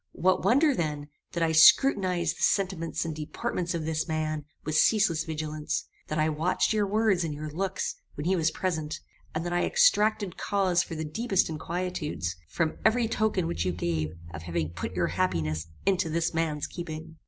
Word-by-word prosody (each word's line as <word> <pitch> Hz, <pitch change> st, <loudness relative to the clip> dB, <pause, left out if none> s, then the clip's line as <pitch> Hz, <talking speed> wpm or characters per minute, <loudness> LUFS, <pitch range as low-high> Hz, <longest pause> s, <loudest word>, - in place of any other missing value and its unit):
What 185 Hz, +2 st, +2 dB
wonder 280 Hz, +4 st, +4 dB
then, 150 Hz, -, -3 dB, 0.2 s
that 170 Hz, -, 0 dB
I 165 Hz, -, +2 dB
scrutinized 180 Hz, -, +5 dB
the -, -, -8 dB
sentiments 185 Hz, -5 st, 0 dB
and 160 Hz, -2 st, -3 dB
deportment 170 Hz, +3 st, -3 dB
of 160 Hz, -2 st, -3 dB
this 160 Hz, +1 st, -1 dB
man 155 Hz, -2 st, -2 dB, 0.2 s
with 155 Hz, -, -2 dB
ceaseless 170 Hz, -1 st, +3 dB
vigilance; 155 Hz, -1 st, -3 dB, 0.2 s
that 155 Hz, -, -3 dB
I 155 Hz, 0 st, +3 dB
watched 160 Hz, +7 st, +1 dB
your 210 Hz, -2 st, +1 dB
words 205 Hz, -3 st, +2 dB
and 155 Hz, -3 st, -3 dB
your 150 Hz, +1 st, -6 dB
looks 190 Hz, +4 st, -2 dB, 0.2 s
when 145 Hz, -, -5 dB
he 190 Hz, +2 st, +3 dB
was 165 Hz, -2 st, +2 dB
present; 160 Hz, -3 st, -3 dB, 0.4 s
and 160 Hz, +2 st, -2 dB
that 175 Hz, -, -2 dB
I 175 Hz, -, +2 dB
extracted 215 Hz, -, +3 dB
cause 190 Hz, -3 st, +1 dB
for 165 Hz, -, -6 dB
the 160 Hz, 0 st, -3 dB
deepest 195 Hz, +4 st, +1 dB
inquietudes, 160 Hz, -, -3 dB
from 160 Hz, -2 st, -1 dB
every 225 Hz, +1 st, +3 dB
token 215 Hz, -5 st, 0 dB
which 170 Hz, -, -1 dB
you 90 Hz, -1 st, 0 dB
gave 80 Hz, -3 st, -1 dB, 0.2 s
of 80 Hz, -, -6 dB
having 85 Hz, -2 st, -2 dB
put 85 Hz, +2 st, -5 dB
your 90 Hz, -1 st, +2 dB
happiness 80 Hz, -, -1 dB, 0.2 s
into 185 Hz, -4 st, +2 dB
this 165 Hz, +2 st, 0 dB
man's 155 Hz, -2 st, -1 dB
keeping? 160 Hz, -1 st, -7 dB
165 Hz, 180 wpm, -28 LUFS, 155-185 Hz, 0.4 s, scrutinized